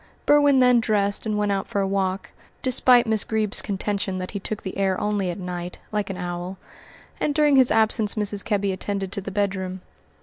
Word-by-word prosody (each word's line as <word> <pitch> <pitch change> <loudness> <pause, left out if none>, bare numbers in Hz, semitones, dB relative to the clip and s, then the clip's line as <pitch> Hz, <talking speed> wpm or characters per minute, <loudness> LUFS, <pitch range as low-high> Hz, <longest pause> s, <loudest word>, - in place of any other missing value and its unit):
Berwin 290 -2 +5
then 250 -1 +5
dressed 205 -1 0
and 210 -1 -1
went 205 -1 0
out 195 -1 -2
for 220 -4 -2
a 195 - 0
walk, 195 0 -2 0.3
despite 250 -1 +4
Miss 220 -2 +1
Greeb's 220 -2 -1
contention 195 -1 -2
that 185 0 -5
he 200 - -4
took 210 +2 -5
the 190 - -6
air 195 -1 0
only 205 -3 -1
at 175 - -4
night, 180 -1 -6
like 210 -2 -2
an 190 - -5
owl, 175 +1 -5 0.6
and 290 - -1
during 295 -2 +4
his 260 -2 +5
absence 220 -1 +3
Mrs. 205 -2 0
Kebby 200 -2 0
attended 195 0 -4
to 200 - -3
the 195 - -6
bedroom. 190 -2 -2
200 Hz, 200 wpm, -23 LUFS, 190-220 Hz, 0.6 s, Berwin